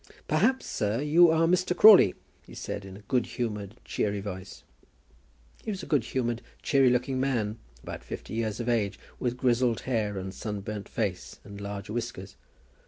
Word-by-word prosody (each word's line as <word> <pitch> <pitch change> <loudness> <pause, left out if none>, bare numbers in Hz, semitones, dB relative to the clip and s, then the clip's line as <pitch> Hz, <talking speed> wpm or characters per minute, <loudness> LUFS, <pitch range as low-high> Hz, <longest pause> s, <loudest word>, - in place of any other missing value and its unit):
"Perhaps, 220 +13 +2
sir, 105 +1 -1
you 160 +4 +6
are 160 +1 +3
Mr. 180 +1 +1
Crawley?" 200 - +8 0.3
he - - -12
said, 100 - -5
in 95 0 -9
a - - -13
good 120 +4 0
humoured, 105 -4 -4
cheery 100 -1 -1
voice. 95 -1 -7 1.0
He - - -5
was 195 -3 -4
a - - -5
good 145 -6 +2
humoured, 120 -2 -2 0.2
cheery 135 -3 +4
looking 125 +2 0
man, 115 -5 -1 0.2
about - - -7
fifty - - -7
years 110 -1 -2
of 120 - -3
age, 110 -5 +1 0.2
with 125 -1 -1
grizzled 125 -2 +2
hair 110 -5 -1
and 95 0 -5
sunburnt 105 -1 -5
face, 100 -5 -3
and 100 0 -10
large 100 0 -5
whiskers. 115 -5 -5
115 Hz, 170 wpm, -28 LUFS, 100-135 Hz, 1.0 s, Crawley